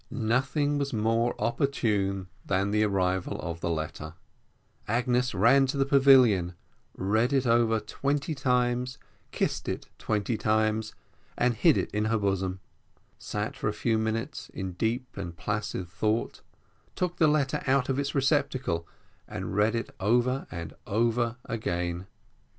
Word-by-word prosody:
Nothing 135 +5 0
was 140 -1 -2
more 115 +2 +1
opportune 105 - 0 0.2
than 100 +1 0
the 105 +1 +3
arrival 95 -3 0
of 85 -1 -5
the 85 - -2
letter; 80 -2 -4 0.7
Agnes 125 +1 +1
ran 135 +8 +5
to 140 - -2
the 135 - +3
pavilion, 130 -10 +5 0.4
read 110 +6 +1
it 135 -2 +2
over 115 -1 +3
twenty 140 +6 -2
times, 125 -2 0 0.3
kissed - - -1
it - - -5
twenty 110 +1 -1
times, 110 +1 0 0.4
and 125 0 +2
hid 155 +7 +4
it - - -2
in 105 +1 0
her 110 +1 +2
bosom; 95 -2 -1 0.6
sat - - -4
for - - -3
a - - 0
few 115 -2 0
minutes 115 +5 -3
in 95 -1 -3
deep 115 +7 -2
and 85 -4 -6
placid 105 -2 -3
thought, 105 +7 -1 0.5
took 180 -1 -2
the 160 - +5
letter 150 -3 +1
out 135 -1 +3
of 135 0 0
its 140 0 -2
receptacle, 130 - +1 0.4
and - - -5
read 105 +3 +3
it 115 - -3
over 120 +6 +1
and 85 -1 -6
over 115 +2 +1
again. 90 -4 -3
115 Hz, 145 wpm, -28 LUFS, 100-130 Hz, 0.7 s, ran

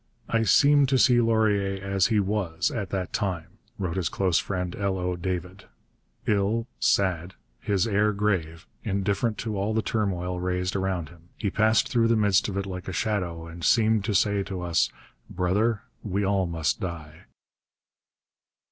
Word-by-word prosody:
'I 115 0 +2
seem 145 +4 +5
to 135 0 +2
see 125 -2 +5
Laurier 105 -4 +1
as 100 +1 +2
he 110 -2 +2
was 95 -4 -1
at 105 -6 -3
that 95 -1 -3
time,' 95 -7 -3 0.2
wrote 90 -2 -3
his 90 -4 0
close 95 -4 +1
friend, 90 -2 -3
L. 100 -1 -1
O. 90 0 -2
David, 90 +1 -4 0.6
'ill, 105 +2 +1
sad, 90 -2 +1 0.2
his 100 - 0
air 105 0 +2
grave, 90 -6 -1 0.2
indifferent 100 +2 -1
to 110 -3 -3
all 105 +3 -1
the 110 - +1
turmoil 90 -5 -1
raised 90 +1 -1
around 95 -5 -1
him; 85 0 -19
he 100 -4 -2
passed 110 +1 +3
through 115 -2 +3
the 115 - +3
midst 105 -3 +3
of 100 - -4
it 100 - -1
like 90 -2 -6
a - - -3
shadow 90 -5 -2
and 85 +1 -10
seemed 110 0 +3
to 105 - -1
say 100 +1 +2
to 95 -2 -5
us, 85 -5 +1 0.4
"Brother, 100 +5 0 0.2
we 100 -1 -1
all 95 -2 +1
must 80 -2 -1
die."' 80 -3 -7
95 Hz, 165 wpm, -26 LUFS, 90-105 Hz, 0.6 s, seem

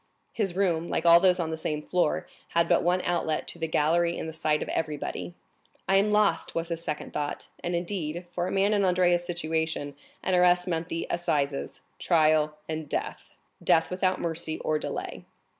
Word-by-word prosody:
His 195 -6 -1
room, 175 -4 +1
like 165 - -1
all 170 0 +8
those 180 0 +4
on 165 -2 -1
the 160 - -3
same 150 -1 -2
floor, 175 -3 0 0.3
had 170 0 +4
but 175 - +4
one 180 +2 +1
outlet 165 -3 -1
to 170 - -6
the 165 - -1
gallery 170 +3 +2
in - - -4
the 160 - -6
sight 150 -1 0
of - - -8
everybody. 155 +2 -3 0.5
"I 195 - +4
am 200 +2 +3
lost!" 210 -5 +2
was 165 +1 -2
his 165 0 -4
second 150 -3 -4
thought; 145 -1 -4
and, 175 0 -1
indeed, 175 -1 -3
for 175 0 -2
a - - -3
man 195 +2 +2
in 205 -1 +2
Andrea's 180 -1 +3
situation, 160 -4 -2 0.3
an 185 - 0
arrest 180 0 +4
meant 165 -1 -2
the 165 - -2
assizes, 145 -5 -1 0.2
trial, 155 -2 +3
and 155 -2 -4
death,—death 165 +2 -1
without 185 0 +1
mercy 160 -1 -2
or 155 0 0
delay. - - -5
170 Hz, 185 wpm, -27 LUFS, 160-180 Hz, 0.5 s, all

